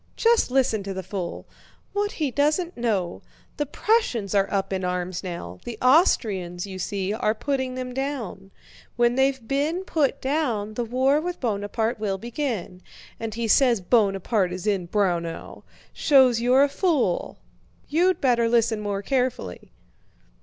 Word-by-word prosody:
Just 465 - +3
listen 250 -5 +2
to 195 -1 -5
the 190 - -4
fool, 180 -2 -5 0.5
what 410 0 -1
he 295 -4 -1
doesn't 305 +7 +1
know! 205 -7 -1 0.4
The 295 - -1
Prussians 260 - 0
are 200 -1 +2
up 195 -1 -1
in 190 -1 -2
arms 180 0 -2
now. 170 - -6
The 235 -2 -6
Austrians, 205 - +2
you 190 -1 -7
see, 195 +1 -2
are 215 -1 0
putting 260 +1 -2
them 255 -1 -5
down. 250 -8 -4 0.5
When 240 0 +3
they've 265 -2 +1
been 300 +8 0
put 295 -6 0
down, 255 -7 -1
the 240 - -2
war 260 +5 +2
with 355 +1 -4
Buonaparte 220 0 -1
will 200 -3 -1
begin. 225 - -4 0.4
And 225 -1 -4
he 230 0 -2
says 240 0 +4
Buonaparte 195 -1 +1
is 180 +1 -6
in 195 -4 0
Braunau! 170 -4 -2 0.3
Shows 260 -5 +4
you're 255 +3 +5
a - - +4
fool. 280 - 0 0.5
You'd 355 +5 +2
better 235 -3 +2
listen 230 -2 +2
more 200 -1 -3
carefully!" 250 - -2
230 Hz, 150 wpm, -24 LUFS, 195-275 Hz, 0.5 s, you're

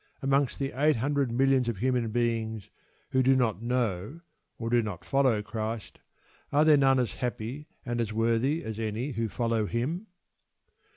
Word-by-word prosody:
Amongst 135 0 +2
the 135 -1 -2
eight 150 +3 +3
hundred 140 +1 0
millions 130 0 +3
of 115 - -3
human 125 +1 0
beings 110 -2 -1 0.4
who 130 - +3
do 130 +1 +4
not 115 -5 +1
know 120 - -1 0.4
or 115 0 -4
do 120 0 +4
not 105 -6 -6
follow 130 -6 +2
Christ, 110 0 -5 0.5
are 150 +2 +4
there 155 -1 +7
none 135 -2 +4
as 125 -6 0
happy 125 +4 -4 0.2
and 120 -1 -1
as 110 -2 -2
worthy 115 +7 +1
as 110 0 -5
any 110 +5 -2
who 115 -2 -2
follow 115 -1 0
Him? 155 - -2
120 Hz, 165 wpm, -28 LUFS, 110-135 Hz, 0.5 s, there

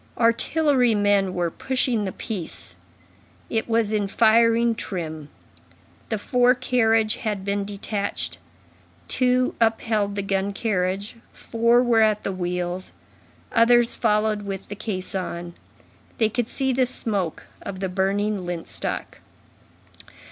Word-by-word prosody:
Artillery 245 +1 +3
men 200 -2 +2
were 175 -2 0
pushing 250 -3 -1
the 190 - -2
piece; 190 -6 -6 0.8
it 225 0 -1
was 225 -2 +2
in 205 -2 +1
firing 230 +2 +4
trim; 160 -8 -5 0.8
the 220 - 0
fore 250 +4 +3
carriage 225 -3 +2
had 205 -4 -3
been 200 0 -1
detached; 200 0 -4 0.7
two 255 0 +2
upheld 220 -2 +1
the 200 - -2
gun 195 0 -1
carriage, 200 0 -2
four 235 +1 +2
were 235 -2 +3
at 215 -1 +2
the - - -2
wheels; 180 0 -3 0.6
others 240 +1 +4
followed 215 -1 +1
with 195 -1 -6
the 205 - -5
caisson. 185 -4 -4 0.6
They 220 -2 +3
could 240 +1 -1
see 265 0 0
the 255 0 +2
smoke 200 -9 -2 0.2
of 190 - -6
the 190 - -1
burning 195 +2 0
lint 175 -2 -5
stock. - - -4
210 Hz, 125 wpm, -24 LUFS, 195-230 Hz, 0.8 s, firing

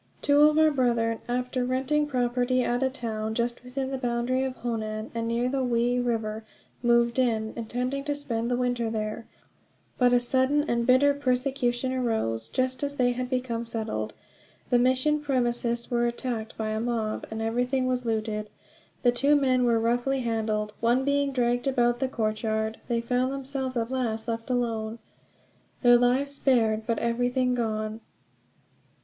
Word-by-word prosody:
Two 290 +1 +6
of 305 - 0
our 315 0 +5
brethren, 235 -4 +1
after 250 +1 -1
renting 265 +4 0
property 250 -1 +1
at 245 +1 0
a 265 - +2
town 220 -4 -4
just 240 +1 -2
within 260 +1 -4
the 265 - -3
boundary 245 +1 0
of 260 -1 -3
Honan, 220 -2 -4
and 230 0 -2
near 235 +1 0
the 265 +1 0
Wei 245 0 +1
River, 225 -3 -2 0.4
moved 235 0 +3
in, 220 -3 +1
intending 250 +4 -3
to 290 -1 -1
spend 235 -5 -2
the 245 - +1
winter 245 -2 0
there; 215 +1 -4 0.7
but 250 -1 +5
a 245 - +5
sudden 260 +4 +2
and 235 0 0
bitter 270 +3 +5
persecution 255 -2 0
arose, 220 - -1
just 255 +1 -1
as 285 0 -2
they 250 -2 +2
had 250 +1 -3
become 250 -3 -2
settled. 215 - -4 0.6
The 245 - +5
mission 260 +4 +2
premises 240 -4 -1
were 240 0 +2
attacked 235 -2 -4
by 220 -1 -2
a 215 0 -1
mob, 225 -2 -2
and 220 - -5
everything 245 +4 0
was 255 -1 0
looted. 215 -2 -2 0.5
The 245 - +5
two 280 +4 +3
men 260 -3 +3
were 230 -1 +3
roughly 245 +4 +1
handled, 215 -2 -1
one 240 +3 +2
being 280 0 +1
dragged 245 0 0
about 240 -2 +2
the 265 - +1
courtyard. 220 -2 -1
They 235 -1 0
found 250 +2 0
themselves 265 -1 -3
at 230 +1 -1
last 235 -4 -2
left 230 +1 -3
alone, 230 -3 -1 0.9
their 245 0 +7
lives 255 +3 +2
spared, 225 -6 +1
but 230 -2 +1
everything 245 +2 +1
gone. 220 -2 -2
245 Hz, 165 wpm, -27 LUFS, 230-255 Hz, 0.9 s, their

